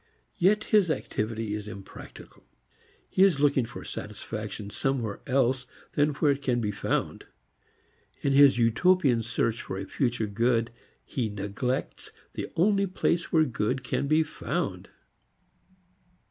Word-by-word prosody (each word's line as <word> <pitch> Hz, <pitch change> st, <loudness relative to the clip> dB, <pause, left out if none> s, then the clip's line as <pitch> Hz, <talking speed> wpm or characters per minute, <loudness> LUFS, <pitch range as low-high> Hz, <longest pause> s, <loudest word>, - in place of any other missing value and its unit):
Yet 210 Hz, +4 st, +4 dB
his 205 Hz, -5 st, +3 dB
activity 110 Hz, -6 st, -2 dB
is 105 Hz, 0 st, -4 dB
impractical. 100 Hz, -3 st, -11 dB, 0.6 s
He -, -, 0 dB
is 190 Hz, -7 st, +5 dB
looking 140 Hz, -4 st, +3 dB
for 120 Hz, -, -9 dB
satisfaction 105 Hz, 0 st, -6 dB
somewhere 120 Hz, -6 st, -2 dB
else 130 Hz, -1 st, +1 dB, 0.3 s
than 145 Hz, 0 st, +2 dB
where 150 Hz, 0 st, +3 dB
it 140 Hz, 0 st, -2 dB
can 125 Hz, -3 st, +1 dB
be 105 Hz, -3 st, -1 dB
found. 100 Hz, -, -2 dB, 1.0 s
In 140 Hz, -, +1 dB
his 140 Hz, -2 st, +7 dB
utopian 125 Hz, +2 st, +3 dB
search 115 Hz, 0 st, -1 dB
for 95 Hz, -, -5 dB
a 95 Hz, -, -4 dB
future 120 Hz, 0 st, -1 dB
good 115 Hz, +2 st, +1 dB, 0.3 s
he 120 Hz, -5 st, -2 dB
neglects 105 Hz, +6 st, -3 dB, 0.2 s
the -, -, -5 dB
only 200 Hz, +3 st, +3 dB
place 175 Hz, -2 st, 0 dB
where 160 Hz, -1 st, +5 dB
good 125 Hz, +2 st, -1 dB
can 140 Hz, -, -1 dB
be 155 Hz, +2 st, +4 dB
found. 155 Hz, -, -4 dB
125 Hz, 135 wpm, -27 LUFS, 110-145 Hz, 1.0 s, his